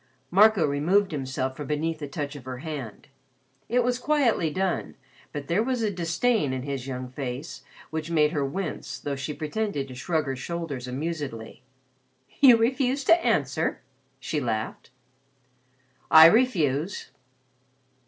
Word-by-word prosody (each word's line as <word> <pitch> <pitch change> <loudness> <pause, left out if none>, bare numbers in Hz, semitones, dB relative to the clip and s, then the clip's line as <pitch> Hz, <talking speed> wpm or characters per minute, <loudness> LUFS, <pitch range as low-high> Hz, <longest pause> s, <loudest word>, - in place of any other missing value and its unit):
Marco 200 -2 +5
removed 175 +8 +2
himself 130 -2 -3
from 145 -1 -7
beneath 155 +2 -1
the 145 - -5
touch 145 0 -5
of 135 -3 -10
her 130 -1 -5
hand. 135 -7 -7 0.6
It 245 +1 +2
was 250 +1 0
quietly 250 - +2
done, 185 +3 -2 0.4
but 145 -2 -6
there 170 +7 +2
was 245 0 -1
a 210 - +1
disdain 170 - 0
in 130 -1 -3
his 135 -2 -4
young 130 -1 -4
face 130 +1 -6 0.3
which 160 0 -4
made 155 -2 +3
her 145 -4 -1
wince 155 +5 -4
though 145 -1 -4
she 135 +2 -4
pretended 155 -1 -3
to 130 - -9
shrug 155 +5 -1
her 135 -1 -3
shoulders 140 -2 -5
amusedly. 135 -4 -5 0.8
"You 255 -5 +8
refuse 260 +3 +1
to 335 +5 +4
answer?" - - 0 0.4
she 155 - -2
laughed. 110 -4 -3 1.2
"I 160 0 +10
refuse." 170 - +2
155 Hz, 145 wpm, -26 LUFS, 135-200 Hz, 1.2 s, I